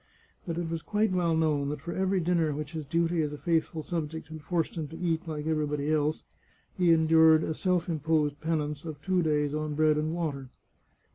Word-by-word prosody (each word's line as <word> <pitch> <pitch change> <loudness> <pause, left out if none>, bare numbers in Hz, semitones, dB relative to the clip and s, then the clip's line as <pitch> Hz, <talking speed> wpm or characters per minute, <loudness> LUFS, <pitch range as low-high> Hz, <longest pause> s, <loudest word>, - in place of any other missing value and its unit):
But 165 -1 -3
it 175 -1 -2
was 165 0 -3
quite 210 +2 0
well 175 -3 +1
known 150 -3 +1
that 150 0 -4
for 170 - -5
every 190 0 +1
dinner 165 -3 +1
which 150 0 -5
his 155 -3 -6
duty 165 +2 +1
as 150 -1 -1
a 150 - -6
faithful 160 -1 -1
subject 160 -2 -4
had 155 -1 -8
forced 165 +1 -1
him 160 -3 -3
to 160 - -10
eat 165 -1 -1
like 150 -2 -4
everybody 150 -2 0
else, 155 0 0 0.5
he 180 -2 +3
en 160 -1 +4
dured 160 0 +6
a - - -1
self 180 +1 0
imposed 155 -2 0
penance 150 -2 -2
of 155 -3 -7
two 185 +1 +2
days 150 -3 +1
on 155 -1 -2
bread 155 0 +3
and 155 +2 -1
water. 140 -6 -3
160 Hz, 210 wpm, -28 LUFS, 150-170 Hz, 0.5 s, dured